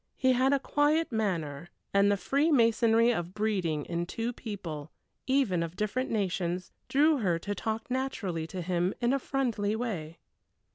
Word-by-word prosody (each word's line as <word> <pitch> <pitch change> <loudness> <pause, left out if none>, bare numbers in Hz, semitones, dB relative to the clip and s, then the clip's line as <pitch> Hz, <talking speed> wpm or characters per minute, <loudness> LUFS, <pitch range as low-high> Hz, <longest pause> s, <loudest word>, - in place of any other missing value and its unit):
He 260 -1 +3
had 260 +2 +3
a 280 - +4
quiet 295 +3 +1
manner, 175 -8 -2 0.2
and 200 0 +5
the 200 - +2
freemasonry 235 - +3
of 180 -4 -3
breeding 185 -9 0
in 170 0 -2
two 230 +5 -3
people, 170 -10 -6 0.4
even 260 -10 +2
of 165 +1 -4
different 215 +6 -1
nations, 180 -3 -1 0.2
drew 300 +3 +4
her 180 -7 +1
to 205 +5 -4
talk 220 +3 -3
naturally 200 -11 -2
to 180 +1 -5
him 180 +1 0
in 240 +1 +2
a 275 - +2
friendly 235 -7 -1
way. 175 -9 -4
210 Hz, 155 wpm, -29 LUFS, 175-250 Hz, 0.4 s, and